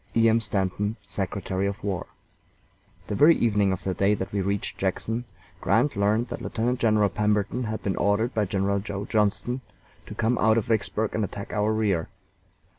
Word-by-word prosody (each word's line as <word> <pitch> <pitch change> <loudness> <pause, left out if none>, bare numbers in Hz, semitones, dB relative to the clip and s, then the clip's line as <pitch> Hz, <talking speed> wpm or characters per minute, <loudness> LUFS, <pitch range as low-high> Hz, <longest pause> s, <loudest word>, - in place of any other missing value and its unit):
E. 115 0 +5
M. 115 +1 +4
STANTON, 105 0 -1
Secretary 95 0 -2
of 100 +3 -5
War. 95 -4 -2 1.0
The - - -4
very 150 +10 +6
evening 105 -4 +2
of 95 - -3
the 95 - -1
day 100 +3 +2
that 95 0 -5
we 100 - +1
reached 100 +1 -2
Jackson, 110 +5 -1 0.3
Grant 145 - +2
learned 105 +4 +1
that - - -5
Lieutenant 120 +2 -1
General 110 -3 +3
Pemberton 105 +4 0
had 110 0 -4
been 95 - -1
ordered 105 +5 +1
by 105 -2 +1
General 100 +1 0
Joe 100 0 -5
Johnston 110 +4 0 0.5
to 105 - -8
come 115 +2 +1
out 110 +1 +4
of 115 - +1
Vicksburg 110 -1 0
and 110 - 0
attack 100 0 -6
our 105 0 +1
rear. 105 -7 0
105 Hz, 180 wpm, -26 LUFS, 100-110 Hz, 1.0 s, very